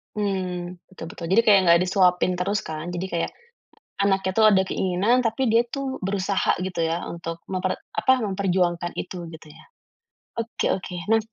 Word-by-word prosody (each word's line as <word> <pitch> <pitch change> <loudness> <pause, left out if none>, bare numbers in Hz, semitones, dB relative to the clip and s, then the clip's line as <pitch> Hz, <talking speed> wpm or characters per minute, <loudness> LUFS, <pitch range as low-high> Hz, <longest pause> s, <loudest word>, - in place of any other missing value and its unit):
Mmm, 185 -3 -3
betul 190 -4 -10
betul. 175 -4 -8
Jadi 190 +6 +4
kayak 210 -3 +6
gak 170 0 +7
disuapin 185 -1 +3
terus 200 +3 0
kan, 155 +1 -5
jadi 180 +2 -3
kayak. 170 -1 -2 0.6
Anaknya 195 -1 +1
tuh 220 - +5
ada 190 - +5
keinginan, 195 +9 +1
tapi 230 +3 0
dia 230 +1 +4
tuh 275 -1 -3
berusaha 195 -1 0
gitu 180 -2 -2
ya, 165 +1 -2
untuk 165 0 -6
memper 185 0 -2 0.2
apa, 255 +4 +3
memperjuangkan 185 -5 0
itu, 180 -2 -6
gitu 160 -1 -12
ya? 150 - -15 0.8
Oke 230 0 -1
oke. 185 -1 -4 0.2
Nah 225 - +5
190 Hz, 165 wpm, -24 LUFS, 175-210 Hz, 0.8 s, gak